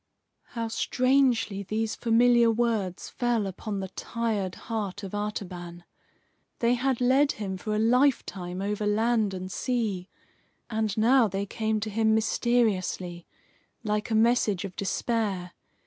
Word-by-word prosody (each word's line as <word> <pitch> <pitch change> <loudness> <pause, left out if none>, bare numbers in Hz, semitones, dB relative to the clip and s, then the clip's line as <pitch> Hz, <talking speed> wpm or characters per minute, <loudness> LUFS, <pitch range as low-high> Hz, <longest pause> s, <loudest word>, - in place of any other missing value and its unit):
'" - - -52
How 230 0 -1
strangely 250 -3 +1
these 215 +3 -2
familiar 235 0 +4
words 225 -5 0
fell 240 -4 0
upon 195 +2 -4
the 190 - -4
tired 210 -3 -2
heart 205 -3 -4
of 195 - -7
Artaban! 180 -4 -5 0.7
They 235 0 +2
had 255 0 0
led 270 +3 +4
him 195 -3 -4
for 210 +3 -3
a - - +1
lifetime 220 -6 +1
over 210 +1 -1
land 220 -1 +1
and 185 0 -6
sea. 215 -8 -2 0.6
And 220 -2 -1
now 235 +2 +5
they 195 +1 -3
came 220 +1 -1
to 215 - -2
him 220 +1 +2
mysteriously, 200 -7 0 0.6
like 210 0 -1
a 225 - +1
message 220 -4 +2
of 185 -2 -8
despair. 200 -3 -1
215 Hz, 135 wpm, -27 LUFS, 195-235 Hz, 0.7 s, now